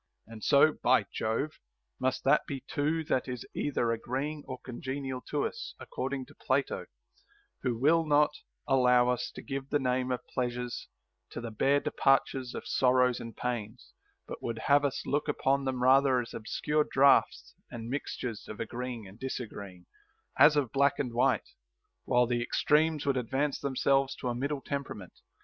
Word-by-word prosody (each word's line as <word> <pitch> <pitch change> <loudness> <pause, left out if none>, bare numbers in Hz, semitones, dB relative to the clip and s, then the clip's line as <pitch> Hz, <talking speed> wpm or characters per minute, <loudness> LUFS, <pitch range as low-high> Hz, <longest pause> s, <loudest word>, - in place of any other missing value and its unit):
And 110 -1 -11
so, 150 +2 +5
by 130 +1 +4
Jove, 115 +8 -2 0.4
must 130 0 -1
that 135 - +3
be 140 -5 -5
too 155 +3 0
that 130 -4 0
is 125 -2 -5
either 120 -5 0
agreeing 135 +6 -3
or 130 - -5
con 125 -1 -9
genial 130 -1 -4
to 145 -1 0
us, 230 - -6
according 135 0 -4
to 145 - -17
Plato, 140 0 -1 0.7
who 125 -3 -1
will 160 +7 +4
not 150 0 +4 0.4
allow 125 -2 +4
us 125 0 -1
to - - -8
give 135 -1 -5
the 145 - +2
name 130 -1 0
of 125 - -3
pleasures 125 -1 -3 0.4
to - - -6
the 115 -1 -6
bare 140 +6 +3
departures 135 -2 +1
of - - -6
sorrows 125 -1 +3
and 115 -1 -8
pains, 120 -1 -4 0.3
but - - -7
would 115 -1 -3
have 145 0 +5
us 140 - -2
look 145 +2 0
upon 140 -1 +1
them 130 -2 -1
rather 130 0 +5
as 120 - -5
obscure 150 +7 0
draughts 140 +1 +4 0.2
and 115 -1 -7
mixtures 125 -3 -4
of 110 - -8
agreeing 120 -2 -5
and 95 +4 -14
disagreeing, 100 -8 -6 0.5
as 150 - +7
of 140 -6 +1
black 140 0 +3
and 125 -4 -2
white, 120 - +2 0.6
while 125 0 +3
the 120 0 0
extremes 150 +4 +2
would 140 -2 +1
advance 135 +4 -1
themselves 135 0 +1
to 125 - -4
a - - -1
middle 140 +3 -2
temperament. 135 -11 -5
130 Hz, 165 wpm, -30 LUFS, 120-140 Hz, 0.7 s, as